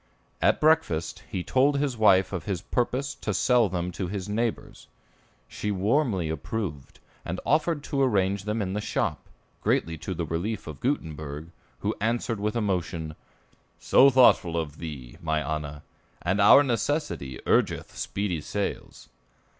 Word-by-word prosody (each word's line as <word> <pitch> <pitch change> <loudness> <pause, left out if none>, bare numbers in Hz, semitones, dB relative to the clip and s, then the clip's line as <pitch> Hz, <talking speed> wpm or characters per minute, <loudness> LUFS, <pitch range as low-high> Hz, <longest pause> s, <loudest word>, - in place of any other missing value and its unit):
At - - +3
breakfast 150 - +2
he 90 - -3
told 140 +6 +3
his 140 -3 0
wife 100 -4 +4
of 95 - -4
his 95 -4 -2
purpose 130 +7 -1
to 105 -7 -4
sell 120 0 +3
them 90 0 -2
to 90 +1 -4
his 95 +1 -4
neighbors. 115 +2 -3 0.6
She 105 - -4
warmly 105 - +1
approved, 80 -1 -5 0.2
and 90 +2 -4
offered 155 0 +1
to 140 -3 -1
arrange 100 -6 +1
them 105 0 -1
in 95 -1 -3
the 105 - -2
shop, - - -1 0.4
greatly 80 -1 0
to 95 - -4
the 85 0 -2
relief 100 +7 -3
of 75 -3 -8
Gutenberg, 80 - -3 0.3
who - - 0
answered 115 0 -1
with 105 +3 -1
emotion, 90 -7 -2 0.6
"So 135 - +6
thoughtful 120 -10 +5
of 80 -2 -4
thee, 70 -6 -8
my 80 -2 0
Anna; 75 0 -4 0.4
and 95 +4 +1
our 105 +8 +8
necessity 125 - -2
urgeth - - +1
speedy 95 -6 -2
sales." 100 +6 -4
100 Hz, 145 wpm, -26 LUFS, 80-120 Hz, 0.6 s, our